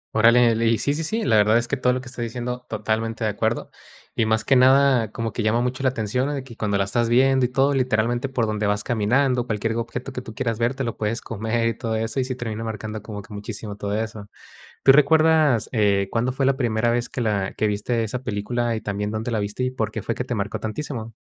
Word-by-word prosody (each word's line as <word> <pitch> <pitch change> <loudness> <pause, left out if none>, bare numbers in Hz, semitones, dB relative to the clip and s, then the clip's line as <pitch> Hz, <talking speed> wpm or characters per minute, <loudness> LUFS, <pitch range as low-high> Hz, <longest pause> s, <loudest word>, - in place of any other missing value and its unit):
Órale, 115 +1 +5
le 115 +1 +1
y 115 - +3
sí, 140 - 0
sí, 160 +2 -3
sí, 220 +7 -2
la 110 - +3
verdad 105 +2 +5
es 120 0 -1
que 140 - 0
todo 125 -1 +2
lo 125 - -1
que 130 - -11
está 125 -1 -7
diciendo, 125 +1 -4
totalmente 110 +1 -2
de 105 - +1
acuerdo. 110 +3 -2 0.4
Y 110 - +1
más 110 0 +1
que 135 - +4
nada 130 -3 +5
como 115 -1 -4
que 115 - -2
llama 110 +2 +2
mucho 125 +2 -2
la 130 - +3
atención 125 +3 -1
de 135 - -4
que 125 -3 -12
cuando 105 -2 -1
la 100 - +2
estás 115 +4 0
viendo 130 +1 +4
y - - -14
todo, 135 +2 +2
literalmente, 120 0 0
por 125 -4 0
donde 105 -1 -1
vas 105 0 0
caminando, 125 +3 +1
cualquier 110 0 -1
objeto 120 +3 -4
que 125 - -4
tú 110 -3 -10
quieras 115 -2 -2
ver 120 +3 +1
te 135 - -3
lo 115 -2 -4
puedes 110 +2 -1
comer 115 +1 -2
y 115 - -1
todo 110 -1 -2
eso, 115 +4 -2
y 130 - +1
sí 130 0 -4
termina 115 -2 -4
marcando 110 -1 -5
como 105 -2 -7
que 115 - -13
muchísimo 105 0 -6
todo 100 0 -3
eso. 110 -2 -6 0.5
¿Tú 135 - +6
recuerdas, 150 -3 +4
eh, 100 -4 +2
cuándo 120 +2 0
fue 135 +1 -1
la 135 0 +3
primera 115 -2 +1
vez 120 0 0
que 125 - -5
la 100 -4 0
que 110 - +1
viste 105 +3 -1
esa 120 +4 -4
película, 115 +3 -1
y 110 - -3
también 105 +1 -3
dónde 110 +2 -3
la 115 - 0
viste 105 +4 -3
y 125 - 0
por 110 -4 -3
qué - - -4
fue 115 - -3
que 125 - -2
te 125 -1 -3
marcó 100 0 -2
tantísimo? 115 -1 -5
115 Hz, 255 wpm, -23 LUFS, 110-125 Hz, 0.5 s, Tú